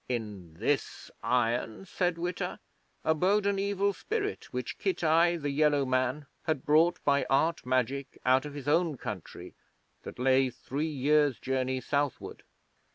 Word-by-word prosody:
In 105 -9 -5
this 125 - -2
iron, 120 - 0
said 180 -2 -1
Witta, 175 +1 -3 0.4
abode 185 +6 +2
an 200 -1 +1
Evil 200 0 +1
Spirit 420 - -4
which - - -4
Kitai, 170 - +2
the 145 -2 -2
Yellow 145 -1 +3
Man, 130 +3 0 0.2
had 155 -5 -1
brought 160 +4 +4
by 140 -1 +3
Art 155 +1 +1
Magic 130 +2 -1
out 130 +1 +4
of 145 -1 -8
his 145 -1 -7
own 160 -1 +2
country 100 -7 -7 0.5
that - - -9
lay 130 +1 +3
three 140 +5 -4
years' 145 -2 +2
journey 130 0 -1
southward. 140 +1 -2
145 Hz, 140 wpm, -29 LUFS, 130-170 Hz, 0.5 s, brought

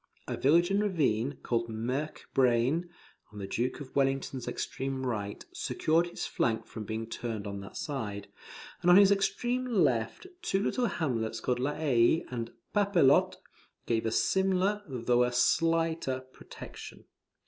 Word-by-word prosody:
A - - -2
village 170 +6 +3
and 200 +1 +2
ravine, 145 - 0
called 115 -1 -1
Merk 125 +7 -3
Braine, 130 +7 +2 0.4
on 105 - -12
the 100 - -4
Duke 120 +6 -2
of 130 - -10
Wellington's 135 -2 0
extreme 135 0 -3
right, 105 -5 -3
secured 165 +2 +1
his 175 - -5
flank 110 -1 -1
from 110 - -8
being 110 +1 -3
turned 115 -2 -5
on 100 -1 -5
that 100 - -9
side; 105 -9 -4 0.5
and 175 - +2
on 180 - +9
his 200 0 +7
extreme 240 +5 +1
left, 155 - +1 0.2
two 195 - 0
little 245 +1 +1
hamlets 115 - -2
called 125 +2 -1
La 140 +4 -1
Haye 140 0 +3
and 115 -2 -4 0.2
Papelotte, 195 -9 +4 0.5
gave 115 -1 0
a - - 0
similar, 190 - +2
though 125 -2 +1
a 125 - 0
slighter, 165 +1 +1
protection. - - -11
130 Hz, 150 wpm, -30 LUFS, 115-170 Hz, 0.5 s, on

